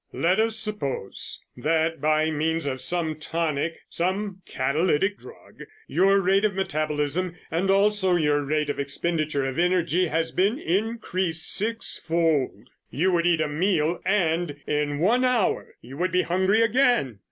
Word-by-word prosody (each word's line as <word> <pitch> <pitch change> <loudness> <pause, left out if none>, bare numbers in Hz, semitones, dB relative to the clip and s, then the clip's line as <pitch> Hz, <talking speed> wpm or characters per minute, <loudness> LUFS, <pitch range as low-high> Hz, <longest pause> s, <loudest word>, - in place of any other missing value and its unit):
"Let 180 +4 +1
us 225 0 +1
suppose 210 - -4
that 160 +3 0
by 155 +1 +2
means 160 +1 -1
of 130 -2 -2
some 160 +2 0
tonic, 160 0 -2
some 190 +2 -2
catalytic 155 +8 0
drug, 460 - -15 0.2
your 195 - +3
rate 195 +2 +2
of 210 -3 +1
metabolism 155 0 -1 0.2
and 180 +4 0
also 195 -1 +3
your 150 -3 +2
rate 150 +1 0
of - - -7
expenditure 150 0 -1
of 135 +3 -3
energy 180 0 +2
has 160 +1 -1
been 200 +7 +1
increased 185 - -1
six 225 +2 -2
fold. 155 -9 0 0.2
You 180 +7 +1
would 175 -1 +2
eat 170 -2 +3
a 155 - +1
meal 165 +1 0
and 170 -5 0
in 150 -1 -1
one 225 - +2
hour 250 -5 0
you 130 +4 -10
would 180 +3 0
be 180 - +2
hungry 190 +5 +2
again. 230 - +2
170 Hz, 150 wpm, -25 LUFS, 150-195 Hz, 0.2 s, your